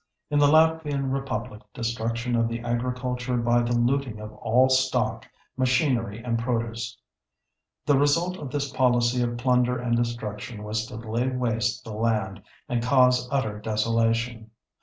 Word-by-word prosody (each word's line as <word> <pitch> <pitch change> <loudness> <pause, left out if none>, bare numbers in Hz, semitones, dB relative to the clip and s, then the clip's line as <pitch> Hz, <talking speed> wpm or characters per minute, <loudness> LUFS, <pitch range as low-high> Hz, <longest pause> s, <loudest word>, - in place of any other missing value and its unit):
In 145 - +3
the 145 - +6
Latvian 155 -3 +3
Republic 125 -4 -4
destruction 115 +1 -2
of 115 0 +2
the 115 0 -4
agriculture 125 +1 -2
by 120 0 +2
the 120 0 0
looting 120 -2 0
of 105 0 -8
all 115 +4 +3
stock, 130 0 +1 0.3
machinery, 125 -4 +1
and 115 -2 -1
produce. 115 -1 -3 0.9
The 145 -2 +4
result 170 +6 +2
of 145 -6 -6
this 140 0 -2
policy 120 -1 +2
of 120 0 -1
plunder 125 0 +2
and 120 -1 0
destruction 115 -1 -3
was 110 +1 -2
to - - -9
lay 115 +3 -2
waste 115 -3 -1
the 110 - -8
land 105 -3 -1 0.3
and 120 -1 -1
cause 125 0 +3
utter 110 -7 -1
desolation. 115 +1 0
120 Hz, 145 wpm, -25 LUFS, 115-130 Hz, 0.9 s, the